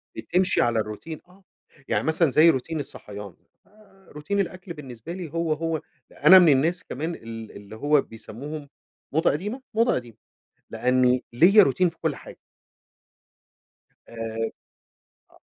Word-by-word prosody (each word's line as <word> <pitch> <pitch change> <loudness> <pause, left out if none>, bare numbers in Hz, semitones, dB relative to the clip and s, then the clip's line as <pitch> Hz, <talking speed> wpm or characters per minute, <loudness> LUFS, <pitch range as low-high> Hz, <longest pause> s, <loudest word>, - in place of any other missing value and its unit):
بتمشي 180 +11 +1
على 120 -1 +2
الروتين، 110 +9 -6
آه، 190 +2 -22 0.4
يعني - - 0
مثلًا 160 -1 +2
زي 155 +5 +6
روتين 160 +2 -1
الصحيان، 105 -8 -8 0.6
آآ، 195 -1 -25
روتين 150 +8 -2
الآكل 185 -1 -4
بالنسبه 130 -1 -9
لي 180 -3 -6
هو، 165 -1 -1
هو، 160 0 -2 0.4
أنا 185 +5 +10
من 170 -5 +6
الناس 165 +7 +1
كمان 160 +6 -4
ال 115 -3 -9
اللي 100 +2 -11
هو 145 +5 +3
بيسموهم 140 +6 -9 0.4
موضة 160 +3 +3
قديمة، 210 - -4
موضة 230 +2 +3
قديمة؛ 120 -3 -16 0.5
لأني 125 0 +2
ليّا 185 - +7
روتين 180 +3 +2
في 165 - -10
كل 160 -3 -1
حاجة. - - -12 1.7
آآ، - - -13 1.2
آه. - - -21
155 Hz, 140 wpm, -25 LUFS, 125-175 Hz, 1.7 s, أنا